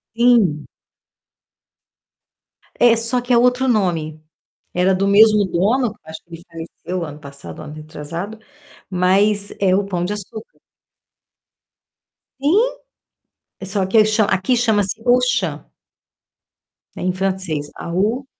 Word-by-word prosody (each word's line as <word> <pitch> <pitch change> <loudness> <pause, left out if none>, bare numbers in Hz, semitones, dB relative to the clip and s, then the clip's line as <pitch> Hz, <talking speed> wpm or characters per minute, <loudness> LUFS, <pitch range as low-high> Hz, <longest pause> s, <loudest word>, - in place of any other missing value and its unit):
Sim. 225 -11 +3 2.1
É, 240 -1 +6
só 230 +2 0
que 245 0 -1
é - - +5
outro 250 +2 +2
nome. 165 -9 -1 0.5
Era 185 +1 +2
do 195 +1 0
mesmo 210 +1 +5
dono, 220 +6 0
acho 160 0 -10
que 170 - -13
ele 165 - -11
faleceu 170 +2 -6
ano 150 -1 -9
passado, 140 0 -11
ano 150 0 -9
retrasado, 160 +7 -7 0.5
mas 200 +3 +1
é 190 -2 +3
o 200 - 0
Pão 180 -3 -3
de 195 - -2
Açúcar. 215 +2 -10 1.8
Sim, 390 - +2 0.9
só 195 0 -1
que 215 +3 +4
cha 215 0 +2
aqui 200 +5 +1
chama-se 215 -3 0
Auchan. 250 0 +1 1.3
É - - -8
em 185 0 0
francês, 185 -6 -3
A-U, 210 +10 -2
195 Hz, 115 wpm, -19 LUFS, 175-230 Hz, 2.1 s, É